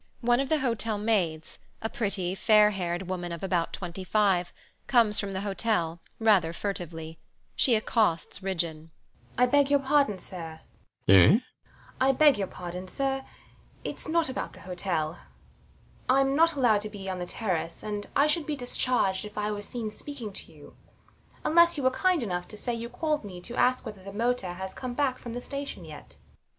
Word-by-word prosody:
One 240 0 +3
of 275 -1 -1
the 310 -1 +2
hotel 230 -4 -1
maids, 185 -8 -1 0.2
a 225 - -2
pretty, 200 -5 -2
fair 210 +1 +5
haired 175 -2 -2
woman 175 -2 -3
of 170 +1 -6
about 180 -3 0
25, 185 0 0 0.4
comes 230 -5 +4
from 200 -1 -3
the 190 0 -3
hotel, 195 -5 -1 0.2
rather 200 -7 +3
furtively. 165 -4 -5 0.4
She 245 - +4
accosts 215 -7 +1
Ridgeon. 165 -4 -3 0.5
THE - - 0
MAID. - - +8
I - - +8
beg 285 +2 +3
your 285 0 +4
pardon, 275 -6 +2
sir 165 -4 -8 0.5
RIDGEON. 95 0 +9
Eh? - - +8
THE 155 - +7
MAID. 230 +5 +2 0.6
I 265 +1 +5
beg 270 -9 +4
pardon, 180 +1 -7
sir. 270 +5 -1 0.6
It's - - -4
not 330 0 +2
about 260 - -4
the - - -13
hotel. 175 -3 -2 0.9
I'm 270 +1 +4
not 330 +2 +5
allowed 240 -7 +3
to 215 - -5
be 200 -2 -8
on 185 -1 -3
the 175 - -4
terrace; 175 -7 -2
and 210 -1 -4
I 285 - +5
should 300 0 +1
be 300 - -1
discharged 245 -6 +1
if 210 0 -10
I 210 0 0
were 205 -1 -4
seen 220 +1 -4
speaking 235 -3 -6
to - - -5
you, - - -15 0.7
unless 340 +1 +5
you 285 - -2
were 260 - +4
kind 360 +2 +2
enough 180 -4 -3
to 210 - -9
say 240 +3 -2
you 235 0 -4
called 300 +3 -1
me 185 -3 -8
to 235 +6 -7
ask 255 +1 +2
whether 210 -4 -8
the 195 +1 -8
motor 230 -3 -1
has 190 +1 -6
come 250 -2 -5
back 265 -2 0
from 235 - -7
the 245 - -4
station 280 +2 -6
yet. - - -11
210 Hz, 190 wpm, -28 LUFS, 185-255 Hz, 0.9 s, RIDGEON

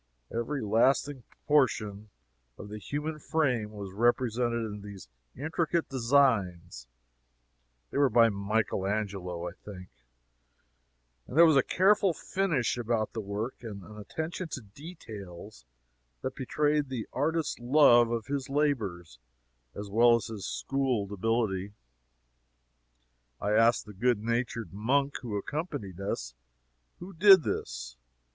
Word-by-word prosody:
Every 120 +4 -2
lasting 130 +5 +2 0.3
portion 110 -8 +1 0.5
of 105 - -9
the 105 +1 -7
human 150 +6 -4
frame 130 -10 0
was 100 -3 -8
represented 120 +1 +1
in 105 -1 -6
these 100 -7 -10 0.3
intricate 160 +3 -1
designs 110 - +1 1.0
(they - - -1
were 140 -2 +5
by 115 0 +5
Michael 100 -1 -1
Angelo, 95 -4 -3
I - - -5
think,) 90 -1 -11 1.4
and 135 - -6
there 170 - +9
was 160 -3 +5
a 135 - +6
careful 195 +4 +3
finish 165 -12 -1
about 115 -2 -1
the 115 - -3
work, 105 +5 -4
and 105 -5 -8
an 105 +4 -11
attention 160 - -5
to 135 - -4
details 105 - -11 0.6
that 130 - -2
betrayed 145 +2 0
the 125 -5 -4
artist's 160 +1 -1
love 120 -2 +5
of 115 -2 -2
his 140 -2 -3
labors 105 - -1 0.6
as 100 0 -6
well 115 +4 +5
as 115 - -2
his 110 -4 -6
schooled 130 -7 -1
ability. 100 -2 -1 1.7
I 105 - -1
asked 115 +2 +4
the 105 - -11
good 120 +4 +2
natured 115 -1 -2
monk 135 +7 0
who 110 -5 -4
accompanied 140 - -5
us, - - -3 0.6
who 185 +2 -10
did 190 0 +7
this? - - -4
115 Hz, 125 wpm, -29 LUFS, 100-140 Hz, 1.7 s, there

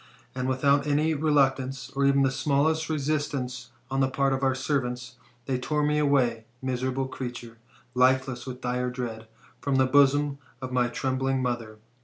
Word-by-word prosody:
And 130 0 -2
without 140 +2 +2
any 150 +2 +2
reluctance, 135 -3 +1
or 140 0 0
even 140 0 +4
the 135 - +2
smallest 150 +4 +1
resistance 140 -5 -2 0.2
on 135 - 0
the 135 0 +3
part 135 0 +1
of 135 - -1
our 135 -1 +2
servants, 125 -3 -2 0.3
they 130 -2 -1
tore 150 +3 0
me 150 0 +2
away, 125 -6 +2
miserable 130 +1 -2
creature, 120 -3 -7 0.3
lifeless 130 0 +2
with 125 0 -7
dire 125 0 -1
dread, 115 -3 -5 0.3
from 140 -1 -1
the 130 0 +4
bosom 145 +1 +3 0.2
of 130 -1 -6
my 125 -1 +2
trembling 130 +2 -1
mother. 120 -3 -3
130 Hz, 160 wpm, -27 LUFS, 125-140 Hz, 0.3 s, even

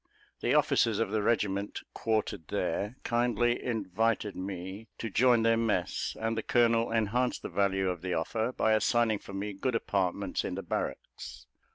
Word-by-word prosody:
The - - +1
officers 115 -3 +3
of 115 - 0
the 110 - +1
regiment 100 -2 0
quartered 110 -8 -1
there, 105 +5 -2
kindly 120 0 +1
invited 110 -2 0
me 95 +3 -6
to 115 - -4
join 120 +1 +4
their 115 0 +4
mess; 105 -6 -1
and 115 0 -1
the 110 - -1
colonel 115 0 +2
enhanced 115 +3 0
the - - -4
value 95 -1 +1
of 90 -3 -2
the 90 -1 -2
offer 110 +8 -1
by 110 -3 +2
assigning 110 0 +2
for 100 - -11
me 100 +1 -3
good 125 +5 -1
apartments 100 -3 -1
in - - -3
the - - -5
barracks. - - -5
110 Hz, 165 wpm, -30 LUFS, 100-115 Hz, -, join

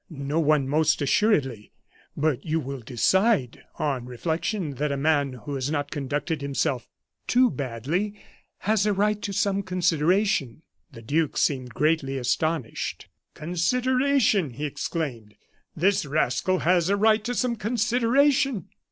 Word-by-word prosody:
"No 145 0 -2
one, 150 -3 +2
most 155 +2 +2
assuredly. 135 - +1 0.4
But 150 -3 0
you 160 0 0
will 140 -2 -5
decide, 135 - +1 0.2
on 135 -5 -2
reflection, 160 - -2
that 150 0 -1
a 140 - -1
man 140 -2 +1
who 125 +3 -7
has 135 0 -2
not 145 -2 -2
conducted 145 +1 -3
himself 140 -3 -1 0.4
too 250 -1 +4
badly 150 - -3 0.4
has 210 0 +1
a 210 - +2
right 210 +1 +1
to 200 - -3
some 200 0 0
consideration." 180 - +1 0.3
The 115 -4 -12
duke 150 +6 0
seemed 130 -5 0
greatly 150 -3 +1
astonished. 135 +1 -2 0.3
"Consideration!" 250 - +1
he 145 +6 -4
exclaimed. 130 -8 -4 0.4
"This 190 +5 +2
rascal 155 +5 +1
has 175 0 +2
a 200 - +2
right 215 +1 +3
to 245 +2 -3
some 245 -1 0
consideration! 240 - +1
160 Hz, 135 wpm, -25 LUFS, 140-205 Hz, 0.4 s, too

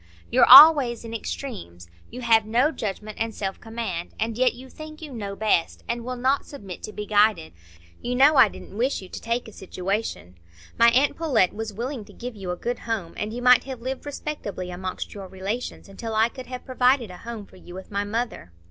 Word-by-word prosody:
You're - - +5
always 265 -4 +9
in 230 - -7
extremes; 200 - -6 0.2
you 250 - -8
have 225 -2 +4
no 240 +8 +2
judgment 215 -4 -5
and 225 -1 -2
self 195 -1 -4
command; 225 -7 -5
and 225 0 -1
yet 250 +1 +2
you 255 +2 -11
think 310 +3 -11
you 300 -4 -9
know 200 -4 -5
best, 210 -5 0
and 235 0 -3
will 255 +1 -4
not 260 +3 +1
submit 200 - -10
to - - -7
be 210 0 -6
guided. 205 - +2 0.5
You 245 +1 -2
know 280 +4 +6
I 260 - +8
didn't 200 - -11
wish 245 -1 -1
you 185 - -12
to - - -8
take 235 +1 -2
a - - -10
situation. 185 - -4 0.4
My 235 0 +6
aunt 265 +5 +2
Pullet 260 - +2
was 220 0 -5
willing 235 +3 -5
to - - -16
give 245 -1 -7
you 195 -3 -7
a 180 - -1
good 240 +7 -4
home, 215 -8 -4
and 210 +1 -4
you 245 +2 -6
might 250 -1 +6
have 265 -3 -6
lived 265 +2 -5
respectably 215 -11 -5
amongst 185 +1 -5
your 195 -2 -8
relations, 195 +7 -5
until 220 +3 -6
I 220 +2 +3
could 255 +1 -10
have 250 -1 -7
provided 255 -4 +2
a 180 - -10
home 230 -3 -7
for - - -18
you 175 -1 -12
with 190 +2 -10
my 200 0 -1
mother. 215 - -4
225 Hz, 215 wpm, -24 LUFS, 200-250 Hz, 0.5 s, always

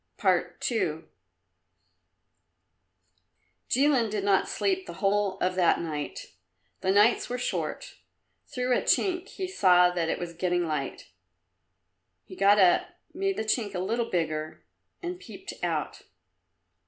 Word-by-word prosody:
II 160 -10 0 2.7
Jilin 265 -4 +3
did 205 -1 -2
not 195 -1 +2
sleep 380 -1 -1
the - - -7
whole 200 -1 +1
of 185 - +1
that 180 -2 +3
night. 150 -3 -5 0.5
The - - -2
nights 205 +4 +4
were 245 - -2
short. 250 - -4 0.5
Through 250 -2 0
a - - +1
chink 365 -1 +1
he 380 -2 -5
saw 180 - +4
that 170 -2 -1
it - - 0
was 175 -1 -6
getting 175 0 0
light. 150 -4 -4 1.2
He - - -11
got 200 +2 +5
up, 190 - +3 0.2
made 390 +2 -1
the - - -1
chink 215 -2 -1
a - - -1
little 230 +5 -1
bigger 155 -3 -3 0.4
and 355 +1 -4
peeped - - -9
out. - - -2
200 Hz, 130 wpm, -27 LUFS, 180-250 Hz, 2.7 s, got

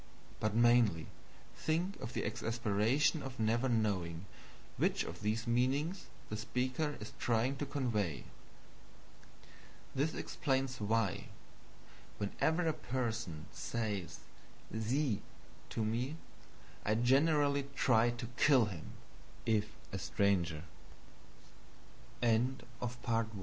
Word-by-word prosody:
But 110 0 0
mainly, 120 -8 +5 0.5
think 170 +5 0
of 115 - -5
the - - -1
exasperation 115 +7 +1
of 135 -2 -7
never 115 +4 +2
knowing 95 -7 0 0.5
which - - +2
of 85 +2 -7
these 110 +2 0
meanings 135 +10 +1 0.2
the 105 - -4
speaker 130 +7 -1
is 105 - -8
trying 120 +3 +1
to 145 - -3
convey. 105 - -1 1.7
This 145 +4 0
explains 135 -3 -1
why, 105 -2 +1 0.9
whenever 160 - +1
a 160 - +2
person 115 - -3
says 105 -6 -3 0.5
SIE 115 +1 +1 0.5
to 110 - -1
me, 120 +7 -1 0.7
I 110 - +2
generally 140 +3 +3
try 120 -3 +4
to 120 0 -4
kill 135 -6 +6
him, 90 -7 -7 0.5
if 105 -2 +2 0.2
a 95 - -3
stranger. 90 -5 +1 1.6
Now 115 +1 +4 0.3
observe 125 0 -4 0.3
th 100 - -6
115 Hz, 105 wpm, -35 LUFS, 105-135 Hz, 1.7 s, kill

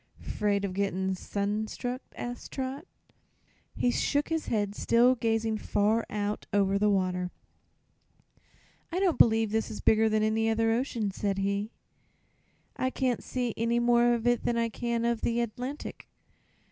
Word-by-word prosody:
"'Fraid 200 -1 -1
of 190 - -4
gett'n' 190 -1 0
sun 205 +3 -2
struck?" 250 +3 -4
asked 245 0 -6
Trot. 265 +1 -4 0.9
He 245 - +2
shook 285 +4 0
his 325 -1 -1
head, 205 -3 0
still 235 +4 +4
gazing 225 -2 0
far 215 +3 +1
out 210 0 -3
over 200 -1 +2
the 210 0 +3
water. 185 -2 0 1.6
"I 355 - -1
don't 375 -4 +1
b'lieve 225 -2 +5
this 220 0 0
is 210 - -6
bigger 220 0 +4
than 215 0 +2
any 220 +1 +2
other 225 0 +2
ocean," 230 -3 -1
said 195 0 -2
he. 200 +2 -1 1.1
"I 260 - 0
can't 255 -2 -1
see 245 -3 -2
any 235 +1 +1
more 240 0 +4
of 230 0 -4
it 240 0 +3
than 235 - 0
I 230 0 +1
can 235 +1 -2
of 235 -1 0
the 235 0 0
Atlantic." 250 +5 -5
225 Hz, 155 wpm, -29 LUFS, 205-240 Hz, 1.6 s, b'lieve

